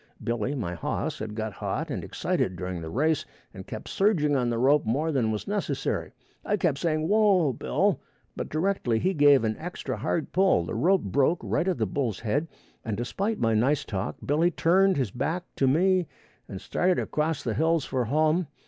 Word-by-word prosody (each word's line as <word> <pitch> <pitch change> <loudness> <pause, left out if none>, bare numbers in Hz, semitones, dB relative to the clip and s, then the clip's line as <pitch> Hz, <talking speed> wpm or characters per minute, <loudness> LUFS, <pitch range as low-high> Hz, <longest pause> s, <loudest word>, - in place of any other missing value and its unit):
Billy, 120 +4 -1
my 105 -10 -3
hoss, 85 - -3
had 105 0 -5
got 110 -1 -3
hot - - -3
and - - -3
excited 95 - -1
during 90 -1 -5
the 80 - -6
race 150 - +1 0.3
and - - -10
kept - - -7
surging 165 -8 +2
on 125 -3 +1
the 120 - -1
rope 140 +5 +4
more 145 +9 0
than 125 -6 +1
was 105 - -4
necessary. 205 0 -2 0.3
I 210 - 0
kept 160 -7 0
saying, 155 -1 0
"Whoa, 200 -8 +3
Bill," - - 0 0.3
but - - -5
directly 155 -8 0
he 185 +11 +1
give 145 -5 +5
an 110 -1 0
extra 180 +2 -5
hard 160 - -2
pull, 185 - +3
the - - -5
rope 175 - +2
broke 140 - +1
right 175 - 0
at 185 - +1
the 110 - +1
bull's 115 -1 -2
head, 140 +9 0 0.4
and 110 -3 -3
despite 195 - -2
my 115 -1 +1
nice 130 +7 +2
talk, 95 -1 -3
Billy 155 +5 +3
turned 185 +3 +3
his 125 -8 -1
back 160 - -2
to 135 - +3
me 180 +5 +3 0.4
and 95 - -6
started 180 - 0
across 155 0 -1
the 115 - -1
hills 160 +2 +1
for 130 -2 -1
home. 155 +6 +2
145 Hz, 195 wpm, -27 LUFS, 115-175 Hz, 0.4 s, give